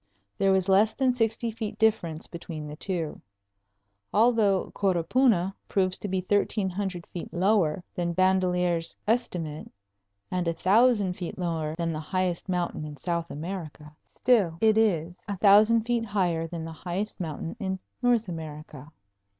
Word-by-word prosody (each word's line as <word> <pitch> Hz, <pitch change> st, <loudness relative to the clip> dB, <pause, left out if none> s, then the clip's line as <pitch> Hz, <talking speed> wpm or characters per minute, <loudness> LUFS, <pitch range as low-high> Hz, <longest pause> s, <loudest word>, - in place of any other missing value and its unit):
There 195 Hz, -, +2 dB
was 190 Hz, -1 st, +2 dB
less 205 Hz, +3 st, +4 dB
than 260 Hz, -2 st, +2 dB
sixty 225 Hz, -1 st, 0 dB
feet 215 Hz, -1 st, -5 dB
difference 190 Hz, -8 st, +1 dB
between 165 Hz, -3 st, -7 dB
the 150 Hz, 0 st, -7 dB
two. 165 Hz, -2 st, -3 dB, 0.9 s
Although 215 Hz, -3 st, +3 dB
Coropuna 195 Hz, +1 st, +2 dB, 0.2 s
proves 185 Hz, -2 st, +1 dB
to -, -, -4 dB
be 190 Hz, -1 st, -1 dB
thirteen 200 Hz, +1 st, +1 dB
hundred 185 Hz, -2 st, -4 dB
feet 175 Hz, -, -8 dB
lower 180 Hz, -3 st, +2 dB
than 170 Hz, -1 st, -2 dB
Bandelier's 180 Hz, -2 st, +1 dB
estimate, 175 Hz, -10 st, -1 dB, 0.6 s
and 180 Hz, -1 st, -1 dB
a 165 Hz, -, +1 dB
thousand 205 Hz, 0 st, +3 dB
feet 175 Hz, -2 st, -5 dB
lower 165 Hz, -4 st, -2 dB
than 165 Hz, -1 st, -2 dB
the 155 Hz, -, -3 dB
highest 185 Hz, +2 st, -2 dB
mountain 175 Hz, -3 st, -1 dB
in 150 Hz, -1 st, -7 dB
South 170 Hz, +2 st, -2 dB
America, 155 Hz, -2 st, -7 dB
still 205 Hz, -10 st, +2 dB
it 220 Hz, -1 st, +4 dB
is 180 Hz, -6 st, +1 dB
a 200 Hz, -1 st, -3 dB
thousand 215 Hz, +4 st, +6 dB
feet 235 Hz, 0 st, 0 dB
higher 180 Hz, -6 st, 0 dB
than 165 Hz, -1 st, -6 dB
the 165 Hz, -, -6 dB
highest 185 Hz, +7 st, -4 dB
mountain 165 Hz, 0 st, -4 dB
in 190 Hz, -3 st, -2 dB, 0.2 s
North 240 Hz, -3 st, +2 dB
America. 155 Hz, -3 st, -8 dB
185 Hz, 150 wpm, -27 LUFS, 165-210 Hz, 0.9 s, thousand